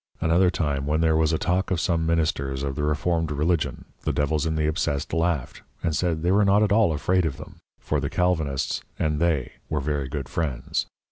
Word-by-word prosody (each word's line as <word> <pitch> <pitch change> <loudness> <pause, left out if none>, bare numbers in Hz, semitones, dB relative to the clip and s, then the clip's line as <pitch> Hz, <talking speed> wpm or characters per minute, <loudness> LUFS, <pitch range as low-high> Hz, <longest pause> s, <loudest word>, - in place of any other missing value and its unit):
Another 85 +3 +3
time 70 -5 -1
when 75 +2 +1
there 80 -1 +3
was 80 0 +3
a 80 - +1
talk 90 +3 0
of 95 - 0
some 85 -1 0
Ministers 70 -5 0
of 70 -1 -2
the 75 - -3
Reformed 80 +2 0
Religion, 75 +3 0 0.2
the - - -1
Devils 75 +2 0
in 80 - -1
the 75 -1 +1
Obsessed 75 -1 -1
laughed 80 -5 -1 0.2
and 80 -2 0
said, 80 -1 0
they 90 - +2
were 105 +2 +4
not 100 +1 +4
at 105 - +1
all 105 -4 +4
afraid 90 +5 +1
of 75 -5 -2
them, - - -11 0.2
for - - -1
the - - -2
Calvinists 80 -7 0 0.2
and 75 -1 0
they 80 -6 +1 0.2
were 75 - 0
very 70 -1 -2
good 70 -2 -4
Friends. 65 -5 -2
80 Hz, 210 wpm, -25 LUFS, 75-85 Hz, 0.2 s, were